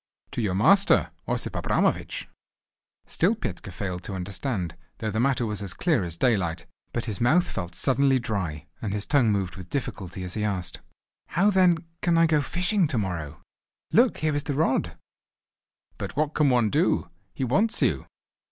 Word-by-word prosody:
"To - - -2
your 100 -4 0
master, 195 - +4 0.2
Osip - - -2
Abramovich." - - 0 0.8
Still 230 - +2
Petka 100 - -5
failed 90 -1 -4
to 95 - -4
understand, 95 - -3 0.2
though 110 - -3
the 110 - -1
matter 125 -1 +2
was 105 -2 -3
as 95 -3 -5
clear 155 - +1
as 85 -1 -4
daylight. 95 -8 +1 0.3
But 120 - -2
his 110 -1 -4
mouth 155 +9 +4
felt 90 -2 -5
suddenly 135 0 +3
dry, 100 -11 -3 0.2
and 105 -3 -2
his 105 -1 -2
tongue 130 -7 +3
moved 95 -3 -1
with 90 -1 -9
difficulty 95 -9 -4
as 90 0 -4
he 105 - -2
asked: 95 -4 -2 0.5
"How 195 +5 +3
then 180 -4 +3 0.2
can 170 -1 +2
I 165 - +6
go 155 -2 +3
fishing 180 +5 +1
to 140 -5 -2
morrow? 80 -7 -3 0.5
Look, 240 +2 +4
here 155 -1 0
is 145 - -1
the 145 - -2
rod." 150 -2 +1 1.0
"But - - -5
what 150 +1 0
can 150 -3 +3
one 120 -4 +3
do? - - +1 0.2
He - - -2
wants 200 - +2
you. - - +1
115 Hz, 175 wpm, -26 LUFS, 95-150 Hz, 1.0 s, I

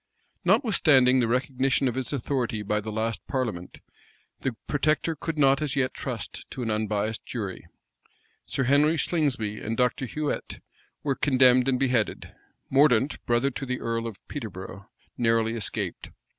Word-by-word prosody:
Notwithstanding 130 - +4
the 120 - +2
recognition 130 +1 +1
of 125 - 0
his 130 0 -2
authority 125 -5 -2
by 105 +1 0
the 110 +1 -5
last 110 +1 -2
parliament, 110 -10 -3 0.6
the 130 -3 -2
protector 155 +2 +1
could 160 +1 -4
not 140 0 +4
as 150 -2 -1
yet 130 -2 +1
trust - - -6
to 130 - -5
an 115 - -1
unbiased 105 0 -1
jury. 100 -6 -5 0.8
Sir 135 - -1
Henry 145 +5 +4
Slingsby 130 -11 0
and 110 +1 -4
Dr. 125 +1 +1
Huet 150 +4 -3 0.4
were 140 - +1
condemned 130 -2 +4
and 130 -2 +2
beheaded. 125 -5 0 0.3
Mordaunt, 135 -1 +3
brother 120 +3 +2
to 135 - -6
the 125 -1 -2
earl 115 0 -2
of 110 -4 -7
Peterborough, 100 -6 -7 0.3
narrowly 115 -1 +2
escaped. 110 -5 -3
125 Hz, 145 wpm, -26 LUFS, 110-140 Hz, 0.8 s, Notwithstanding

